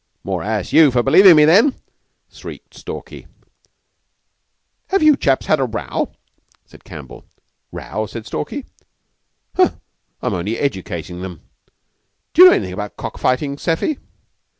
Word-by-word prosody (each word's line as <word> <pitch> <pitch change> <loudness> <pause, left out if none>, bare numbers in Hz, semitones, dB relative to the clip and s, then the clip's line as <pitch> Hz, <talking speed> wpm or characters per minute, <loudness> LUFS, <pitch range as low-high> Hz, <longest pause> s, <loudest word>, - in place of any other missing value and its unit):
"More 95 -3 -3
ass 105 0 -3
you 160 -3 +7
for 120 -2 +1
believin' 180 +7 +7
me, 150 - +7
then!" 210 - +4 0.6
shrieked - - -11
Stalky. - - -9 1.6
"Have 385 -4 +1
you 305 -1 +6
chaps 135 - 0
had 155 - +2
a 135 - +1
row?" 115 -2 -4 0.5
said - - -18
Campbell. 65 - -11 0.5
"Row?" 110 0 -5
said 115 0 -8
Stalky. 275 - -5 0.9
"Huh! 365 -1 +3 0.5
I'm 125 - -2
only 95 +5 -2
educatin' 90 - -4
them. 90 -4 -8 0.9
D'you 365 - +9
know 365 - +9
anythin' 95 - -2
about 105 0 -6
cock - - -7
fighting, 140 +2 0
Seffy?" 175 - -1
130 Hz, 130 wpm, -18 LUFS, -, 1.6 s, D'you